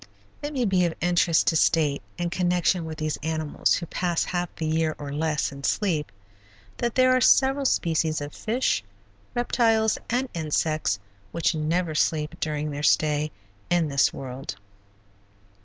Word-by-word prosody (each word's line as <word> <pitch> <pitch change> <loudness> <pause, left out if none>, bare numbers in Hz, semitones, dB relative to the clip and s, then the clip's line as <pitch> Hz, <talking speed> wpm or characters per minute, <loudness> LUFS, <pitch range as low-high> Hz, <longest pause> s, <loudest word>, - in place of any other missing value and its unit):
It 290 0 -4
may 260 -5 0
be 190 -3 +2
of 170 - -2
interest 175 -1 +3
to 160 - +2
state 155 -3 +2 0.2
in 175 -1 -2
connection 180 -1 +1
with 160 -1 -6
these 155 -1 -2
animals 155 -1 0
who 170 - -3
pass 175 0 -1
half 175 -1 -2
the 160 - -4
year, 160 0 0
or 145 -1 -6
less, 155 0 0
in 140 0 -10
sleep, 165 -7 0 0.7
that 235 -1 -2
there 255 0 +5
are 255 - +2
several 270 +3 +4
species 160 -8 +1
of 145 0 -6
fish, 225 - 0 0.5
reptiles, 225 -2 +2
and 250 +3 0
insects 155 -7 0 0.3
which 170 +1 +1
never 160 +2 -1
sleep 155 -1 0
during 150 -1 -2
their 145 0 -4
stay 150 0 +2 0.4
in 175 -3 +2
this 140 -1 +3
world. 130 -3 -6
160 Hz, 155 wpm, -25 LUFS, 150-180 Hz, 0.7 s, there